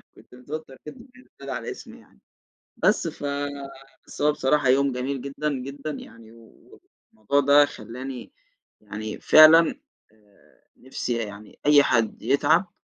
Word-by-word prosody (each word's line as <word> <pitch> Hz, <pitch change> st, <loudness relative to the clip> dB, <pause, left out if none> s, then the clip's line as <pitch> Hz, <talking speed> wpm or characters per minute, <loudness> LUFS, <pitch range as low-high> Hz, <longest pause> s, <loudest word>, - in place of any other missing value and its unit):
كنت -, -, -18 dB
متوتر 145 Hz, +2 st, -8 dB
جدًا 240 Hz, -, -11 dB
وهي 255 Hz, -, -17 dB
بتنادى 140 Hz, 0 st, -11 dB
على 130 Hz, -, -5 dB
اسمي -, -, -12 dB
يعني، 65 Hz, -, -24 dB, 0.6 s
بس -, -, +1 dB
ف -, -, -8 dB, 0.8 s
بس -, -, -10 dB
هو 150 Hz, 0 st, +4 dB
بصراحة 145 Hz, 0 st, 0 dB
يوم 135 Hz, +1 st, +3 dB
جميل 130 Hz, +1 st, -4 dB
جدًا، 140 Hz, +2 st, -4 dB
جدًا، 140 Hz, +3 st, -6 dB
يعني 115 Hz, -5 st, -12 dB, 0.8 s
والموضوع 110 Hz, +6 st, 0 dB
ده 145 Hz, +1 st, +5 dB
خلّاني 125 Hz, +2 st, -9 dB, 0.5 s
يعني 105 Hz, +1 st, -7 dB
فعلًا، 155 Hz, +1 st, +7 dB, 0.4 s
آآ 105 Hz, -2 st, -29 dB
نِفْسي 130 Hz, -1 st, -5 dB
يعني 105 Hz, -2 st, -8 dB
أي 145 Hz, -1 st, +6 dB
حد 115 Hz, -5 st, 0 dB
يتعب، 145 Hz, -, +1 dB
135 Hz, 135 wpm, -24 LUFS, 115-145 Hz, 0.8 s, فعلًا